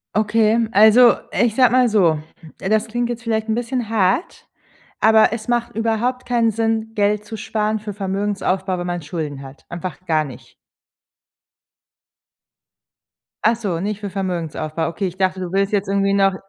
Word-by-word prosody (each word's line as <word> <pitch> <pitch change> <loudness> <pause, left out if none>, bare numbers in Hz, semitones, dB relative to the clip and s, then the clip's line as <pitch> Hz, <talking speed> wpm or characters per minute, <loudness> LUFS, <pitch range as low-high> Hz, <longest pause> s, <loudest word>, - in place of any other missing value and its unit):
Okay, 215 +1 +2
also, 220 +4 +7 0.2
ich 235 -2 +1
sage 255 -3 +5
mal 250 -1 +4
so, 175 -8 +3 0.4
das 215 +3 0
klingt 240 +2 -2
jetzt 240 -1 -5
vielleicht 220 -1 -1
'n 220 - 0
bisschen 240 -1 -2
hart, 215 - 0 0.5
aber 220 0 +5
es 230 -1 -5
macht 240 -1 -1
überhaupt 230 +3 -1
keinen 235 -2 +2
Sinn, 225 0 -1
Geld 210 0 +1
zu 215 +1 -8
sparen 215 +1 -1
für 210 -1 -6
Vermögensaufbau, 195 -1 -2
wenn 175 0 -4
man 175 0 -3
Schulden 150 -2 -5
hat. 135 0 -13
Einfach 180 +1 -7
gar 155 -2 +2
nicht. 130 -4 -12 2.9
Ach 225 +2 +4
so, 200 -7 -3
nicht 205 +3 -3
für 200 -3 -6
Vermögensaufbau. 165 -4 -3
Okay, 190 +4 -3
ich 180 0 -8
dachte, 190 -1 0
du 180 -2 -5
willst 195 +2 0
jetzt 200 -1 0
irgendwie 195 0 +1
noch 195 -1 +3
210 Hz, 160 wpm, -20 LUFS, 185-225 Hz, 2.9 s, also